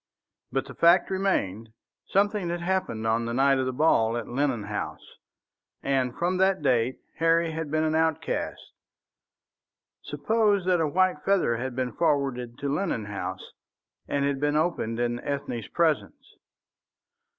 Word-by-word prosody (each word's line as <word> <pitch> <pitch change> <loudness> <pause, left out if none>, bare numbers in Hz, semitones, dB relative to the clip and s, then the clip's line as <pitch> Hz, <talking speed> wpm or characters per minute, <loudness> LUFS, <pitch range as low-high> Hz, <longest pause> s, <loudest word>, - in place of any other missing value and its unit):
But - - -1
the - - -10
fact 175 +3 +4
remained. 115 - -1 0.3
Something 200 -2 +1
had 175 0 -3
happened 175 -11 -1
on 115 +1 +1
the 115 - -3
night 135 +1 +4
of 130 - 0
the - - 0
ball 120 -5 +2
at 120 - -5
Lennon 130 -3 -1
House, 105 +1 -6 0.6
and 130 -3 0
from 180 +2 0
that 190 -3 +2
date 125 -2 +2 0.2
Harry 165 0 +3
had 160 -1 -4
been 155 +1 +1
an 155 0 +1
outcast. 160 0 -1 1.4
Suppose 210 -4 +1
that 180 -2 +3
a 160 - +2
white 185 0 +1
feather 185 -12 +2
had 125 +1 -4
been 130 -1 -1
forwarded 135 -7 0
to 140 - -4
Lennon 155 - -1
House, 95 -2 -6 0.6
and 140 -1 0
had 140 -1 0
been 145 +1 +1
opened 150 -8 0
in 120 0 0
Ethne's 140 -5 -4
presence? 160 -4 -1
145 Hz, 150 wpm, -26 LUFS, 120-170 Hz, 1.4 s, fact